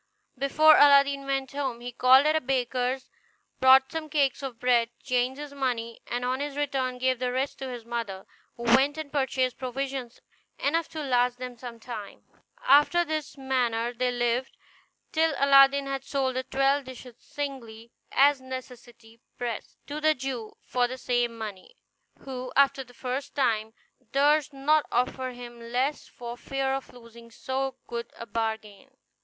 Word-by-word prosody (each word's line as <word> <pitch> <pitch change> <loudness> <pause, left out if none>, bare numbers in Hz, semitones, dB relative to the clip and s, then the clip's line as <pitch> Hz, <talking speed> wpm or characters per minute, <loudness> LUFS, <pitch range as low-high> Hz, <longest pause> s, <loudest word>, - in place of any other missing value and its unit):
Before 300 +4 +5
Aladdin 280 -1 +5
went 270 -1 -1
home 270 -4 -3
he 245 +1 -6
called 255 +3 +6
at 310 +1 +3
a 315 - +2
baker's, 255 0 -1 0.5
bought 265 0 +6
some 320 -1 -5
cakes 285 -4 +1
of 260 -4 -6
bread, 240 -2 +3
changed 255 +1 0
his 295 -1 -7
money, 240 -4 -3
and 245 +1 -2
on 255 +1 -1
his 290 0 -4
return 265 -3 -1
gave 255 -1 +1
the 250 -1 -1
rest 260 +2 -2
to 265 - -5
his 240 -2 -7
mother, 230 -5 -4 0.3
who 235 - -8
went 265 +5 +4
and 310 -2 -6
purchased 260 -3 0
provisions 260 -1 -4 0.4
enough 325 +3 0
to 310 -1 -5
last 245 -2 +2
them 250 -1 -7
some 235 -1 -9
time. 230 -4 -8 0.4
After 345 -2 +5
this 310 -3 -4
manner 245 -3 0
they 250 +1 0
lived, 245 +1 -1 0.5
till 320 -2 +2
Aladdin 275 0 +6
had 275 -1 -3
sold 270 -2 -1
the 260 - 0
twelve 275 +1 +1
dishes 255 -1 -10
singly, 235 -6 -7 0.2
as 280 0 +4
necessity 240 -3 -10 0.2
pressed, 240 -3 -5
to 295 +1 -6
the 310 0 +4
Jew, 250 -4 -5
for 245 -1 +1
the 255 +1 -6
same 240 -2 0
money; 215 - -8 0.5
who, 255 -1 -6
after 275 -1 +4
the 245 -1 -19
first 255 +3 -4
time, 225 -5 0 0.4
durst 295 +1 +3
not 295 +2 +2
offer 255 +1 0
him 240 -1 -10
less 250 +5 -2
for 240 0 -8
fear 270 +1 -2
of 270 0 -4
losing 230 -1 -14
so 265 +2 -3
good 235 0 -5
a 230 - -7
bargain. 220 +2 -4
260 Hz, 160 wpm, -27 LUFS, 240-275 Hz, 0.5 s, called